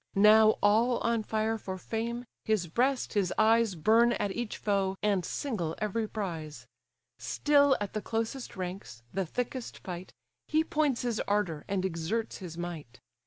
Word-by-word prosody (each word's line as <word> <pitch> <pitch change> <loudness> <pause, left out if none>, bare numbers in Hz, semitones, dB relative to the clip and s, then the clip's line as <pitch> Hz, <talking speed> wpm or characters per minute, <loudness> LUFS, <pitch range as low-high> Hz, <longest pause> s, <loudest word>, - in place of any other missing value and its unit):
Now 215 +2 +6
all 225 +4 +4
on 230 -1 +1
fire 220 +1 -1
for 190 -2 -5
fame, 235 +5 -3 0.2
his 215 -5 +1
breast, 250 - 0
his 195 -4 +1
eyes 220 -2 +4
Burn 225 +8 +4
at 205 - -1
each 235 +1 -4
foe, 195 -2 0
and 200 -3 +2
single 175 - -3
every 215 +1 -1
prize; 165 -8 -5 0.5
Still 285 -2 +3
at 205 -2 -4
the 215 - -2
closest 230 +4 -3
ranks, 180 - -6
the 190 -1 -1
thickest 250 +5 -4
fight, 180 -1 -7 0.4
He 315 +1 +2
points 300 -6 0
his 235 -3 -1
ardour, 200 -7 0
and 190 -1 -1
exerts 190 +6 -2
his 175 -4 -8
might. 160 -8 -6
210 Hz, 155 wpm, -30 LUFS, 185-230 Hz, 0.5 s, Now